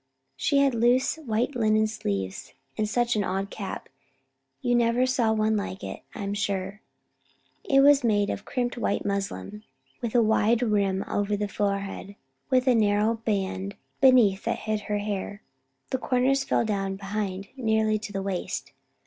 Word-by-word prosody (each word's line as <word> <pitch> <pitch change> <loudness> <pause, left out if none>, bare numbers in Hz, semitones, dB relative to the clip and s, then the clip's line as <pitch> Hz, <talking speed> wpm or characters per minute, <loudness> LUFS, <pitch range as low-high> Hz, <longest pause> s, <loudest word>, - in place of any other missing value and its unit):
She 135 - +1
had 280 -2 +4
loose 240 +5 +2
white 245 -2 -1
linen 215 -2 +3
sleeves, 100 - -4 0.2
and 215 -1 -1
such 240 +1 +1
an 210 - +1
odd 195 +1 -2
cap. - - -6 0.7
You 245 -2 0
never 240 +1 +3
saw 250 -3 +2
one 220 0 +2
like 200 -2 -4
it, - - -6
I - - -5
am 200 0 -2
sure. 200 0 -2 0.8
It 275 0 +4
was 285 0 +6
made 205 -3 +2
of 200 - -5
crimped 245 0 -2
white 200 - -1
muslin 200 +1 -3 0.4
with 235 0 -3
a 235 - +6
wide 220 +2 +3
rim 200 -4 +1
over 205 0 0
the 205 0 -1
forehead, 200 -1 -3 0.3
with 255 -1 +3
a 255 - +6
narrow 210 0 +3
band 200 -3 -2 0.2
beneath 240 -7 +5
that 230 - 0
hid 215 -1 -1
her 210 - +1
hair. 205 0 -4 0.5
The 260 - 0
corners 260 +2 +2
fell - - +1
down 195 -2 -1
behind 195 0 -4
nearly 220 -3 +1
to 210 -1 -7
the 195 -1 -3
waist. 190 -2 -4
215 Hz, 165 wpm, -26 LUFS, 200-240 Hz, 0.8 s, was